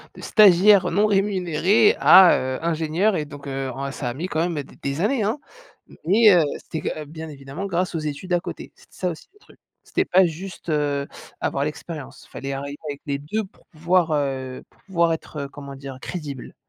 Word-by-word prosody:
de -, -, -11 dB
stagiaire 200 Hz, -1 st, +6 dB
non 210 Hz, +2 st, +3 dB
rémunéré 195 Hz, 0 st, +3 dB
à, 190 Hz, -2 st, +8 dB
heu, 130 Hz, 0 st, -3 dB
ingénieur 170 Hz, +5 st, +1 dB
et 150 Hz, -, -2 dB
donc, 145 Hz, -1 st, -11 dB
heu, 135 Hz, -1 st, -3 dB
en 140 Hz, +1 st, -4 dB
ça 135 Hz, -1 st, -5 dB
a -, -, -4 dB
mis 160 Hz, +8 st, -4 dB
quand 160 Hz, -, -2 dB
même 165 Hz, -4 st, -3 dB
des -, -, -17 dB
des 140 Hz, +4 st, -2 dB
années 230 Hz, +2 st, +1 dB
hein? 220 Hz, +8 st, -1 dB, 0.7 s
Mais 210 Hz, +5 st, +6 dB
heu, 170 Hz, -, +5 dB, 0.2 s
c'était 160 Hz, -, -6 dB
que 155 Hz, -, -4 dB
bien 160 Hz, +2 st, -8 dB
évidemment 140 Hz, +5 st, -7 dB
grâce 180 Hz, -1 st, -1 dB
aux -, -, 0 dB
études 155 Hz, +4 st, -4 dB
à 175 Hz, -, +3 dB
côté. -, -, -8 dB
C'était -, -, -23 dB
ça 180 Hz, -, -1 dB
aussi 165 Hz, -, -8 dB
le 415 Hz, -, -25 dB
truc. -, -, -22 dB, 0.2 s
C'était -, -, -1 dB
pas 185 Hz, +1 st, +5 dB
juste, 175 Hz, +2 st, -8 dB
heu, 145 Hz, -2 st, 0 dB, 0.3 s
avoir 140 Hz, -, -1 dB
l'expérience: 150 Hz, 0 st, -7 dB
fallait 135 Hz, 0 st, -5 dB
arriver 140 Hz, +1 st, -5 dB
avec 145 Hz, -1 st, -5 dB
les 140 Hz, -1 st, -1 dB
2 205 Hz, +10 st, -3 dB
pour 190 Hz, -, -23 dB
pouvoir 170 Hz, -1 st, +1 dB
heu, 135 Hz, -3 st, -2 dB
pour -, -, -29 dB
pouvoir 170 Hz, -4 st, +1 dB
être 160 Hz, -1 st, -7 dB
heu, -, -, -9 dB
comment 140 Hz, -1 st, -9 dB
dire? 135 Hz, -1 st, -8 dB
Crédible. 145 Hz, -7 st, -7 dB
160 Hz, 205 wpm, -23 LUFS, 140-185 Hz, 0.7 s, à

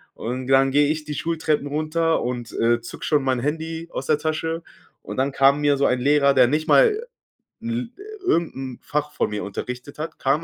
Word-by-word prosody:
Und 125 Hz, +2 st, -4 dB
dann 135 Hz, 0 st, +4 dB
gehe 145 Hz, +1 st, +4 dB
ich 155 Hz, 0 st, -1 dB
die 150 Hz, -, -4 dB
Schultreppen 155 Hz, -2 st, -1 dB
runter 155 Hz, +2 st, 0 dB
und, 120 Hz, -1 st, -4 dB
äh, 120 Hz, +1 st, +2 dB
zucke -, -, -8 dB
schon 150 Hz, -3 st, +2 dB
mein 130 Hz, -2 st, +1 dB
Handy 160 Hz, +4 st, -3 dB
aus 135 Hz, -, -5 dB
der 155 Hz, -, +3 dB
Tasche. 160 Hz, +2 st, -2 dB, 0.4 s
Und -, -, -7 dB
dann 135 Hz, +2 st, +1 dB
kam 135 Hz, +2 st, +4 dB
mir 145 Hz, -1 st, +3 dB
so 140 Hz, -, +2 dB
ein 125 Hz, 0 st, +2 dB
Lehrer, 140 Hz, +1 st, +4 dB
der 130 Hz, -2 st, +6 dB
nicht 150 Hz, +4 st, 0 dB
mal 455 Hz, -2 st, +4 dB, 0.6 s
'n 235 Hz, +1 st, -3 dB, 0.3 s
irgend 170 Hz, -, +1 dB
'n 130 Hz, -2 st, -6 dB
Fach 150 Hz, 0 st, -2 dB
von -, -, 0 dB
mir 105 Hz, 0 st, -3 dB
unterrichtet 125 Hz, +7 st, -6 dB
hat, 160 Hz, -, -5 dB
kam 140 Hz, +4 st, +1 dB
145 Hz, 200 wpm, -23 LUFS, 130-160 Hz, 0.6 s, der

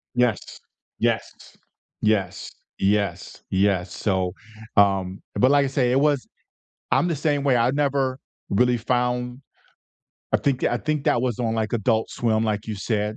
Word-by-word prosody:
Yes, 125 Hz, -3 st, 0 dB, 0.4 s
yes, -, -, 0 dB, 0.7 s
yes, 100 Hz, -3 st, 0 dB, 0.3 s
yes, 100 Hz, +1 st, -1 dB
yes, 95 Hz, -2 st, +1 dB
so, 95 Hz, -3 st, -1 dB, 0.4 s
um, 95 Hz, -1 st, +3 dB
but, 125 Hz, +6 st, +4 dB
like 145 Hz, -1 st, +4 dB
I -, -, 0 dB
say, 130 Hz, -2 st, +1 dB
it 130 Hz, -, +3 dB
was 145 Hz, -2 st, +1 dB, 0.6 s
I'm 175 Hz, -, +3 dB
the 165 Hz, -, -1 dB
same 145 Hz, -1 st, 0 dB
way, 135 Hz, -3 st, +3 dB
I 120 Hz, +1 st, +3 dB
never 135 Hz, -2 st, 0 dB, 0.3 s
really 125 Hz, +4 st, +3 dB
found 125 Hz, +1 st, -1 dB, 0.9 s
I -, -, +6 dB
think 135 Hz, -3 st, 0 dB
tha -, -, +1 dB
I -, -, +2 dB
think 155 Hz, 0 st, -2 dB
that 120 Hz, -, +3 dB
was 125 Hz, -4 st, -1 dB
on, 115 Hz, -2 st, -1 dB
like, 110 Hz, -1 st, -1 dB
Adult 110 Hz, -1 st, +1 dB
Swim, 110 Hz, -2 st, 0 dB
like 105 Hz, -1 st, -2 dB
you 110 Hz, -, -3 dB
said 105 Hz, +1 st, -2 dB
120 Hz, 160 wpm, -23 LUFS, 105-130 Hz, 0.9 s, I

